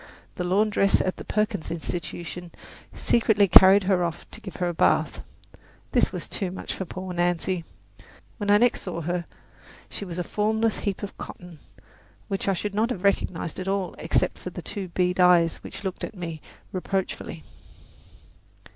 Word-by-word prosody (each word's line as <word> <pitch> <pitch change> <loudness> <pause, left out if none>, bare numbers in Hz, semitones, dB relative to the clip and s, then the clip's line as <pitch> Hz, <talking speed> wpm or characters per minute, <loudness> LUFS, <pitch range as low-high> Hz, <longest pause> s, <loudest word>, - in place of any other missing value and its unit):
The 180 - -3
laundress 200 +2 +3
at 185 - -1
the - - -7
Perkins 210 -4 -1
Institution 175 +1 -5 0.4
secretly 215 -3 +3
carried 190 +2 +9
her 185 -2 +2
off 170 -2 -4
to - - -9
give 190 - -8
her 180 - -1
a 175 - -1
bath. - - +2 0.7
This - - +3
was - - -5
too 195 -4 -3
much 185 - -5
for 190 - -4
poor 185 +1 -6
Nancy. 175 0 0 0.7
When 205 -2 -3
I 205 - +7
next 240 +2 +3
saw 175 -3 -4
her 175 +1 -2 0.7
she - - -5
was 180 -3 -6
a 180 - 0
formless 220 +3 0
heap 200 -1 -3
of 200 - -5
cotton, 175 -3 -9 0.7
which 195 -1 -2
I 195 - +4
should 205 +2 -3
not 220 +3 +1
have 205 -7 -4
recognized 185 -4 0
at 185 - -4
all 195 -2 -1
except - - 0
for - - -6
the - - -8
two 200 -3 -5
bead 180 +1 0
eyes 175 -2 +5
which - - -9
looked 190 -2 -4
out - - 0
at 220 - -14
me 165 -3 -5 0.3
reproachfully. 190 0 -3
185 Hz, 175 wpm, -26 LUFS, 175-200 Hz, 0.7 s, carried